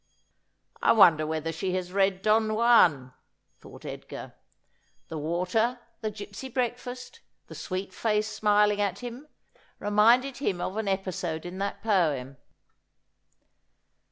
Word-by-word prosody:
' - - -49 0.3
I - - +5
wonder 165 -8 +6
whether 160 +1 -2
she 180 +3 -3
has 180 -1 -4
read 195 -1 +1
Don 215 0 +2
Juan 175 - +4 0.2
?' - - -45
thought - - -14
Edgar. - - -8 0.8
The 160 - -5
water, 180 +10 0 0.2
the 215 - -2
gipsy 205 +4 -8
breakfast, 250 - -4 0.3
the - - -12
sweet 185 0 -5
face 215 0 0
smiling 210 -1 +2
at 200 +2 -2
him, 245 +5 -7 0.5
reminded 230 +6 +3
him 200 -10 -1
of 185 +2 -3
an 220 -2 -2
episode 185 -4 -3
in 180 +2 -7
that 200 0 -4
poem. 150 - 0
200 Hz, 130 wpm, -27 LUFS, 175-225 Hz, 0.8 s, wonder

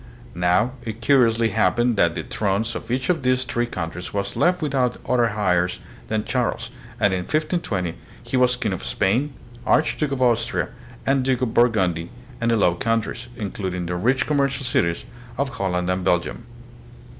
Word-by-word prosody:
Now 90 +7 +2
it 110 -1 -6
curiously 115 -4 +4
happened 110 +4 +2
that 85 -4 +3
the - - -3
thrones 105 +3 -1
of - - -7
each 125 +2 -1
of 165 -5 -1
these 130 0 +2
three 120 -1 -1
coun 80 -7 -4
tries 90 +2 -6
was 100 0 -2
left 180 +1 +3
without 130 -4 +1
other 120 -2 +3
heirs 90 -3 +1 0.3
than 110 -1 -1
Charles, - - -1 0.3
and 100 -2 +3
in 95 - 0
1520 115 - -1 0.3
he - - -3
was 125 -1 +4
King 115 -6 -1
of 90 - -5
Spain, 110 - +1 0.3
Archduke 150 +2 +2
of 135 - -2
Austria, 120 -2 +1 0.4
and 135 0 +3
Duke 130 -1 +1
of 115 -3 -1
Burgundy 95 -9 +2 0.3
and 115 - +1
the 115 - +3
Low 90 -4 +4
Countries, 115 +4 -1
including 95 -4 -3
the 90 +1 -2
rich 125 +9 +2
commercial 140 -2 0
cities 120 - 0 0.3
of 140 0 0
Holland 90 -7 -1
and 90 0 0
Belgium. 90 +6 0
115 Hz, 170 wpm, -23 LUFS, 90-125 Hz, 0.4 s, curiously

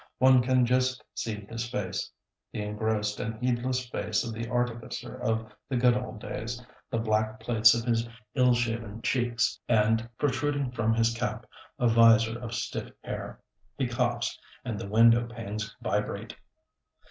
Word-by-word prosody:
One 130 0 +6
can 125 0 +3
just 125 +1 +1
see 105 -3 -4
his 115 +1 -4
face, 100 -5 -3 0.4
the 105 - -3
engrossed 105 0 -1
and 110 - -3
heedless 125 +1 0
face - - -1
of 115 - -4
the 115 +1 -5
artificer 120 0 -2
of 115 -3 -2 0.2
the 130 - 0
good 120 0 +4
old 125 -2 -4
days; 115 +3 -5 0.3
the - - -1
black 110 -1 0
plates 110 -1 +5
of 115 -1 -2
his 115 -1 +1 0.2
ill 125 -1 +4
shaven 115 -2 -2
cheeks; 120 -2 +1
and, 115 +1 +3
protruding 145 -1 0
from 115 -2 +1
his 115 0 +3
cap, 115 -2 -3 0.3
a 125 - 0
vizor 115 -1 +6
of 120 -1 -5
stiff - - -4
hair. - - -6 0.4
He 135 -3 0
coughs, 120 0 -1 0.3
and 115 -5 -3
the 100 - -6
window 115 +2 +5
panes 110 -2 -5
vibrate. - - -2
115 Hz, 155 wpm, -28 LUFS, 110-125 Hz, 0.4 s, One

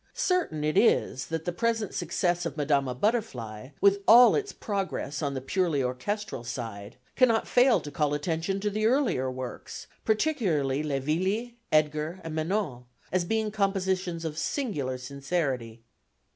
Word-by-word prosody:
Certain 350 - 0
it 155 +5 +3
is, 130 - +2
that 165 -1 -3
the 175 - 0
present 225 +2 -1
success 175 -1 0
of 165 -3 -4
Madama 140 -3 +1
Butterfly, 130 - -2
with 200 0 +4
all 240 +2 +9
its 410 -1 -1
progress 195 -8 -3
on 140 -2 -1
the 130 - -3
purely 160 -1 0
orchestral 130 - -3
side, 115 -4 -6 0.2
cannot 235 -4 +3
fail 250 0 +5
to 145 - -8
call 145 -1 0
attention 165 +5 -1
to 210 0 0
the 215 +2 +1
earlier 240 - +1
works, 130 -1 -7 0.2
particularly 200 - +1
Le 145 -3 -1
Villi, 190 - -1 0.2
Edgar 155 +3 +1
and 160 - -5
Manon, 155 - -2 0.3
as 185 -1 +1
being 220 +2 0
compositions 190 -4 -1
of 155 -1 -3
singular 150 - -2
sincerity. 130 -4 -3
165 Hz, 145 wpm, -28 LUFS, 140-210 Hz, 0.3 s, all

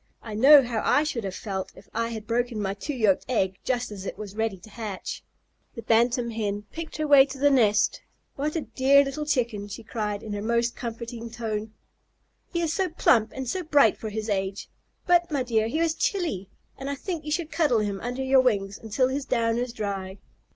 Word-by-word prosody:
"I 220 - -7
know 275 +6 +8
how 235 -3 -2
I 295 - +4
should 255 -7 -3
have 190 -1 -4
felt 190 -3 -4
if - - -15
I 230 +1 -1
had 220 -2 -6
broken 240 0 -1
my 195 -1 -1
two 275 +8 -5
yolked 215 -6 +2
egg 190 -6 0
just 245 -3 -1
as 195 -2 -7
it 195 - -5
was 205 -1 -8
ready 220 -3 -1
to 185 - -15
hatch." 215 -5 -6 0.5
The 230 - -7
Bantam 235 +2 +2
Hen 205 -2 -2
picked 325 -1 -7
her 310 - -1
way 285 -2 +8
to 275 - -8
the 285 +2 +4
nest. 215 -6 +3 0.3
"What 300 +3 -2
a 325 - 0
dear 265 +3 +4
little 295 +2 -4
Chicken!" 235 -8 0
she 205 +3 -8
cried, 210 -2 -3
in 215 - -5
her 205 - -3
most 235 +2 0
comforting 235 0 -6
tone. 220 -2 -4 0.8
"He 340 - -1
is 320 -1 0
so 380 -1 0
plump 235 -8 +3
and 265 -1 -4
so 370 +10 -1
bright 290 - +4
for 220 - -6
his 215 +1 -4
age. 195 -1 -2 0.4
But, 345 -1 +4
my 285 -5 0
dear, 225 -3 +1
he 245 - -2
is 330 -1 +2
chilly, 325 - -1 0.3
and 270 +1 -4
I 280 - -2
think 335 +2 -5
you 300 - -5
should 325 0 -1
cuddle 290 -10 +2
him 200 -2 -3
under 250 +2 -3
your 265 0 +5
wings 200 -6 0
until 225 +4 +1
his 275 +1 -2
down 230 -1 +1
is 245 0 -2
dry." 200 -4 -4
235 Hz, 215 wpm, -26 LUFS, 210-275 Hz, 0.8 s, know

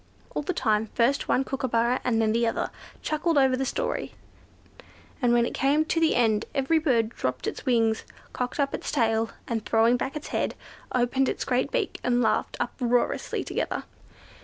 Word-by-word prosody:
All 150 - -1
the 145 - -2
time, 215 0 +1
first 255 +4 +2
one 265 - +2
kookooburra, 250 -2 0
and 230 -2 +1
then 220 0 +2
another, 230 -1 0 0.3
chuckled 310 +1 0
over 265 -2 +4
the 265 +1 -1
story, - - -2 1.1
and 245 -2 +3
when 240 0 +4
it - - -4
came 290 +4 +2
to 330 -1 0
an 325 -1 +3
end 220 -3 +2
every 275 +4 +2
bird 240 -8 +2
dropped 130 - -3
its - - -5
wings, 225 -3 +2 0.3
cocked 250 +3 -3
up 275 -1 +1
its - - -3
tail, 225 -4 +1 0.2
and 225 -2 -2
throwing 225 +2 +3
back 270 +3 -3
its 300 - -6
head, - - -1 0.4
opened 255 +2 +1
its - - -3
great 255 +2 +1
beak, - - -1
and 245 0 +2
laughed - - 0
uproariously 245 -2 0
together. - - -2
245 Hz, 175 wpm, -26 LUFS, 225-270 Hz, 1.1 s, over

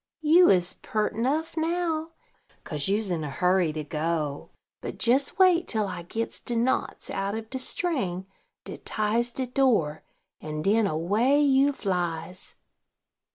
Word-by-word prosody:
you 340 +4 +6
is 180 -2 +3
peart 215 -1 -1
nuff 280 +10 -1
now, 325 -1 -1 0.6
kase 150 -3 -1
you's 205 0 0
in 165 -3 -1
a 150 - -4
hurry 180 +3 +2
to 155 0 -4
go; 150 -1 -3 0.3
but - - -2
jes 265 +4 +2
wait 365 -2 +4
till 220 -2 0
I 185 - -5
gits 225 +7 -4
de 240 - -4
knots 240 +3 -1
out 195 +1 -2
of 220 0 -7
de 260 - -3
string 255 - -2 0.4
dat - - -9
ties 220 +3 0
de 260 +2 -3
door, 235 - +1 0.4
and 155 0 -5
den 210 +3 +3
away 205 - +2
you 280 -1 +4
flies." 180 - -4
215 Hz, 150 wpm, -26 LUFS, 175-270 Hz, 0.6 s, you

